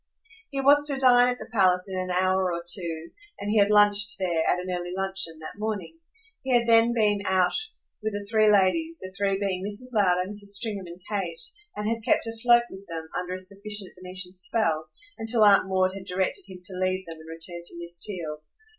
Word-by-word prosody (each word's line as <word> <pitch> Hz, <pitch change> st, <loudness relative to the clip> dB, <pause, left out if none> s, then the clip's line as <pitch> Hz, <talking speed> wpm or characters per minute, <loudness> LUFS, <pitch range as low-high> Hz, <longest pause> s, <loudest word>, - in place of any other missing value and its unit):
He 275 Hz, -, -4 dB
was 290 Hz, +2 st, +4 dB
to 280 Hz, -2 st, +1 dB
dine 245 Hz, -2 st, +5 dB
at 250 Hz, -, -2 dB
the -, -, -9 dB
palace 185 Hz, -3 st, +3 dB
in 190 Hz, -1 st, -3 dB
an 185 Hz, 0 st, -4 dB
hour 185 Hz, 0 st, +1 dB
or 170 Hz, 0 st, -4 dB
two, 170 Hz, -2 st, -3 dB, 0.3 s
and 205 Hz, -, -3 dB
he 215 Hz, -, +3 dB
had 200 Hz, 0 st, +4 dB
lunched 205 Hz, 0 st, +6 dB
there, 175 Hz, -4 st, 0 dB
at -, -, +2 dB
an 180 Hz, +1 st, -5 dB
early 175 Hz, 0 st, -5 dB
luncheon, 190 Hz, -4 st, -1 dB
that 155 Hz, -, -9 dB
morning. 215 Hz, -, -4 dB, 0.4 s
He 260 Hz, -2 st, +2 dB
had 235 Hz, -, -1 dB
then 230 Hz, 0 st, +5 dB
been 210 Hz, -3 st, +1 dB
out 185 Hz, -2 st, +2 dB, 0.5 s
with 215 Hz, 0 st, -3 dB
the 205 Hz, 0 st, -5 dB
three 215 Hz, 0 st, +4 dB
ladies, 320 Hz, -, +2 dB
the 185 Hz, 0 st, -8 dB
three 195 Hz, -1 st, 0 dB
being 190 Hz, -2 st, -2 dB
Mrs. 210 Hz, +5 st, -5 dB
Lowder, 185 Hz, -4 st, +2 dB
Mrs. 205 Hz, 0 st, +1 dB
Stringham 205 Hz, -5 st, -2 dB
and 170 Hz, +1 st, -11 dB
Kate, 185 Hz, -6 st, -3 dB, 0.3 s
and 210 Hz, -, -3 dB
had 230 Hz, 0 st, -2 dB
kept 235 Hz, -, +2 dB
afloat 235 Hz, +1 st, +3 dB
with 190 Hz, +1 st, -11 dB
them, 160 Hz, -1 st, -6 dB
under 180 Hz, 0 st, -3 dB
a -, -, -5 dB
sufficient 200 Hz, +1 st, -3 dB
Venetian 185 Hz, 0 st, -6 dB
spell, 180 Hz, -4 st, +1 dB, 0.3 s
until 225 Hz, 0 st, +2 dB
Aunt 200 Hz, -2 st, +5 dB
Maud 185 Hz, 0 st, +1 dB
had 195 Hz, -1 st, -9 dB
directed 190 Hz, -, -2 dB
him 180 Hz, -1 st, -11 dB
to 185 Hz, 0 st, -6 dB
leave 185 Hz, 0 st, -1 dB
them 165 Hz, -1 st, -9 dB
and 160 Hz, 0 st, -13 dB
return 165 Hz, +1 st, -6 dB
to 170 Hz, -, -7 dB
Miss 170 Hz, 0 st, -7 dB
Theale. 165 Hz, -7 st, -3 dB
195 Hz, 210 wpm, -26 LUFS, 180-215 Hz, 0.5 s, lunched